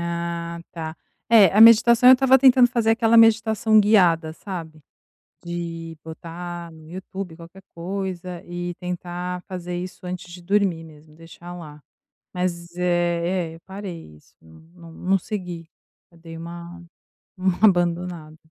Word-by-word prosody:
Ah, 170 0 -4
tá. 160 -1 -6 0.4
É, 215 -4 +8
a 200 +5 +2
meditação 230 +2 +7
eu - - +11
estava 265 0 +4
tentando 255 -2 +6
fazer 230 -2 +1
aquela 225 0 +3
meditação 220 -1 +4
guiada, 175 -6 +3
sabe, 160 -4 -8 0.6
de 165 -1 -6
botar 170 +1 -8
no 160 -1 -15
YouTube 185 -1 -8
qualquer 175 +3 -14
coisa 180 0 -5
e 175 0 -5
tentar 180 0 -5
fazer 180 -1 -5
isso 180 +1 -7
antes 180 -1 -7
de 180 0 -11
dormir 185 -3 0
mesmo, 155 0 -17
deixar 165 +1 -12
lá. 150 -4 -11 0.5
Mas, 175 -1 -4
é 175 0 0
é, - - -11
eu - - -18
parei 185 - -9
isso, - - -25
não 80 0 -18
não 170 -2 -14
não 190 +3 0
segui. 175 -4 -6 0.4
Eu 170 - -21
dei 165 0 -11
uma 170 +1 -9 0.5
uma 185 -1 -1
abandonada. 175 -3 -2
175 Hz, 145 wpm, -22 LUFS, 170-190 Hz, 0.6 s, eu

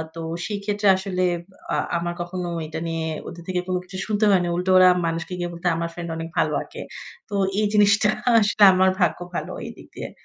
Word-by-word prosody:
তো 165 - -6 0.2
সেই 205 -2 -3
ক্ষেত্রে 205 0 0
আসলে, 185 -1 -2 0.5
আ - - +2 0.2
আমার 175 0 -3
কখনো 175 0 -4 0.2
এটা 160 +1 -5
নিয়ে 165 -1 -2 0.2
ওদের 170 0 -9
থেকে 185 -1 -1
কোন 185 - -1
কিছু 185 +1 -9
শুনতে 215 0 +1
হয় 190 -2 +4
না। 175 - -1
উল্টো 180 +1 0
ওরা 185 0 +8 0.2
মানুষকে 165 +2 -3
গিয়ে 175 - -2
বলতো 170 +1 -4
আমার 170 0 -2
ফ্রেন্ড 170 0 -6
অনেক 165 0 -5
ভালো - - +2
আঁকে। - - -10 0.5
তো - - -9 0.3
এই 215 - +2
জিনিসটা 210 0 +5 0.3
আসলে 210 0 +2
আমার 185 0 +4
ভাগ্য 170 -4 +2 0.2
ভালো - - -3
এইদিক - - -10
দিয়ে। - - -6
185 Hz, 205 wpm, -23 LUFS, 170-200 Hz, 0.5 s, ওরা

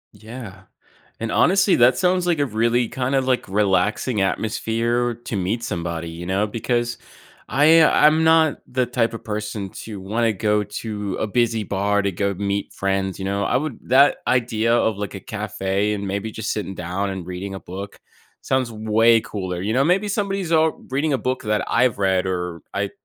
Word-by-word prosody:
Yeah, 110 -4 -10 0.6
and 115 -1 -2
honestly, 195 - +4
that 125 +1 +5
sounds 180 -1 +2
like 170 -3 +1
a 145 - +2
really, 115 +1 +1
kinda, 130 +1 0
like, 130 -1 0
relaxing 105 +3 +1
atmosphere 115 +4 0
to 120 -1 -6
meet 100 +5 -1
somebody, 85 -4 -4
you 85 +1 -8
know? 95 +3 +1
Because 120 +2 -2 0.5
I 155 +7 +6
I'm 155 +1 +5
not 160 -2 +4
the 125 0 0
type 120 -1 0
of 115 - -7
person 105 -2 -4 0.2
to 105 -3 -7
wanna 110 +4 0
go 105 +1 +1
to 105 -1 -5
a - - -1
busy 115 0 +1
bar 100 +1 0
to 100 0 0
go 100 +2 -1
meet 100 +1 -2
friends, 95 -1 -1
you 95 - -5
know? 100 +1 -1
I 110 - +1
would 145 -4 -4
that 135 +3 +5
idea 115 -2 +1
of, 110 -3 +2
like, 100 -3 -5
a - - -6
cafe, 95 +2 -2
and 100 -1 -3
maybe 100 +3 -3
just 110 0 -3
sitting 105 -2 -4
down 90 +3 -3
and 95 -3 -6
reading 90 +2 -5
a 95 - -6
book, 100 +2 -8 0.4
sounds 130 -3 -1
way 110 +1 +3
cooler, 95 -5 -5
you 105 +3 -1
know 130 +4 +3
maybe 190 +6 +2
somebody's, 195 -4 -2
uh, 160 0 +4 0.2
reading 145 +4 0
a 135 - +1
book 130 +1 -2
that 105 0 0
I've 125 -4 +2
read, 95 -1 +1
or 90 -3 -3
I - - -2
110 Hz, 185 wpm, -22 LUFS, 100-125 Hz, 0.6 s, I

